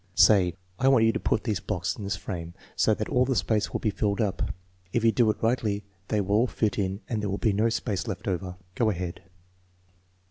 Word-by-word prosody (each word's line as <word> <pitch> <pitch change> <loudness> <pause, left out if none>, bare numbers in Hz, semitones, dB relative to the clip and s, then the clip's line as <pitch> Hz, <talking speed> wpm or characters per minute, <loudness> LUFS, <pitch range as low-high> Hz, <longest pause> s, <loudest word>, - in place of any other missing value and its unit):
Say: 95 -5 +5 0.2
I 130 - +3
want 130 -4 +5
you 115 - +5
to - - -2
put 110 - 0
these 105 -6 -1
blocks 90 +2 -2
in 105 - -8
this 100 - -1
frame 85 -1 -6 0.2
so 110 - +3
that 110 - -3
dl 125 +3 +2
the 130 - +1
space 110 -2 +1
will - - -2
be 110 - +1
filled 100 +1 -1
up. 105 -4 0 0.4
If 120 - 0
you 115 - +5
do 115 -1 +3
it 105 - -2
rigidly 110 -3 +1 0.2
they 105 -2 +1
ynll 100 - -6
all 110 +5 +4
fit 110 -3 -1
in 95 +1 -1
and 110 -3 -2
there 105 - -2
will 100 - -1
be 110 -1 +1
no 110 +3 +2
space 110 -2 -2
left 105 -1 -5
over. 90 -1 -2 0.2
Go 115 +1 +2
ahead." 90 -3 -4
105 Hz, 235 wpm, -27 LUFS, 95-115 Hz, 0.4 s, Say